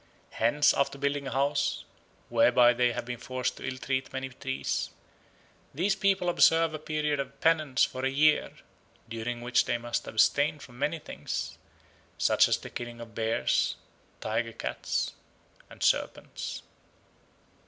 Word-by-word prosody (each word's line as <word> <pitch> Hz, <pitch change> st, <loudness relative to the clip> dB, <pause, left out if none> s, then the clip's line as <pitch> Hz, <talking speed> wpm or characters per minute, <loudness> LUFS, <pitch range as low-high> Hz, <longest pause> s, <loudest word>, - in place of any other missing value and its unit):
Hence 145 Hz, +6 st, +3 dB
after 140 Hz, 0 st, 0 dB
building 140 Hz, 0 st, -1 dB
a -, -, -4 dB
house, 140 Hz, +2 st, 0 dB, 0.5 s
whereby 125 Hz, -, +5 dB
they 120 Hz, 0 st, +2 dB
have -, -, -4 dB
been 120 Hz, -1 st, -5 dB
forced 130 Hz, 0 st, -3 dB
to -, -, -6 dB
ill 130 Hz, -, -3 dB
treat 130 Hz, 0 st, -2 dB
many 130 Hz, 0 st, -4 dB
trees, 135 Hz, +1 st, -3 dB, 0.9 s
these 190 Hz, +6 st, +1 dB
people 195 Hz, -2 st, +1 dB
observe 165 Hz, -2 st, +4 dB
a 155 Hz, -, -4 dB
period 150 Hz, -1 st, -1 dB
of 140 Hz, 0 st, -5 dB
penance 155 Hz, -5 st, +3 dB
for 130 Hz, -, -1 dB
a 135 Hz, -, +2 dB
year 150 Hz, +3 st, +3 dB, 0.6 s
during 115 Hz, +1 st, -4 dB
which 120 Hz, 0 st, +2 dB
they 120 Hz, -, 0 dB
must 120 Hz, 0 st, -3 dB
abstain 145 Hz, +7 st, +3 dB
from 125 Hz, -4 st, -13 dB
many 150 Hz, +4 st, 0 dB
things, 155 Hz, -, -5 dB, 0.6 s
such -, -, +4 dB
as -, -, +2 dB
the -, -, -10 dB
killing 120 Hz, -1 st, -6 dB
of 115 Hz, -1 st, -10 dB
bears, 110 Hz, +1 st, +1 dB, 0.5 s
tiger 115 Hz, +1 st, -1 dB
cats, -, -, -2 dB, 0.6 s
and -, -, -8 dB
serpents. -, -, -1 dB
135 Hz, 145 wpm, -29 LUFS, 120-150 Hz, 0.9 s, whereby